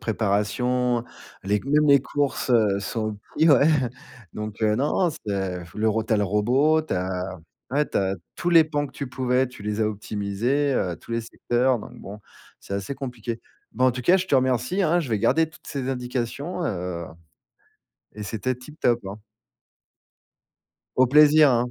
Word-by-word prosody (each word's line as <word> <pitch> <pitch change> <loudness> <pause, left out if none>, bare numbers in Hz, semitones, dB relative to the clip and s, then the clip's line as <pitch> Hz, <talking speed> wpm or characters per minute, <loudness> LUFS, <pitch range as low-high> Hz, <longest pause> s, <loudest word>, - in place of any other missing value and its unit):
préparation, 120 +3 0 0.4
les 100 +2 +1
c - - -4
même 150 +2 +3
les 140 -1 +6
courses, 140 0 -2
heu, 105 -5 +3
sont 110 +1 -3 0.2
livrées 150 -2 +5 0.7
donc 105 0 -6
heu, 105 0 +3
non, 150 +7 +1
non, - - -2
c'est 95 -7 -4
le 110 +1 +1
ro 110 0 0
tu 110 - -2
as - - +4
le 105 - +1
robot, 130 - +2
tu 155 - -3
as, 90 0 -3 0.3
ouais, 150 +2 +1
tu - - -3
as 95 -1 0 0.2
tous 175 - -1
les 165 -2 +8
pans 145 -2 -2
que - - -15
tu 140 - -5
pouvais, 125 0 +1
tu 125 -5 -13
les 105 +1 -2
as 110 - +3
optimisés, 110 +7 -1
heu, 90 -7 -1
tous 115 - -10
les 115 - 0
secteurs 120 +2 0
donc - - -10
bon, 105 +2 -9 0.4
c'est 100 - -6
assez 100 +8 -3
compliqué. 120 -4 -5 0.3
Ben, 130 +1 +2
en - - +5
tout 125 +1 -5
cas, 180 +9 +5
je 190 0 -2
te 140 - +1
remercie, 130 - +1
hein, 175 +1 +3
je 145 - -5
vais 110 -2 0
garder 160 +8 +2
toutes 160 - -19
ces 135 -2 -4
indications, 130 +7 -3
heu 90 - -3 1.1
et 105 - -7
c'était 115 +4 -2
tip 150 +5 -14
top, 120 -1 +2
hein. 100 - -6 1.8
Au 130 0 +5
plaisir, 150 +2 +6
hein. 120 0 +1
125 Hz, 185 wpm, -24 LUFS, 105-140 Hz, 1.8 s, les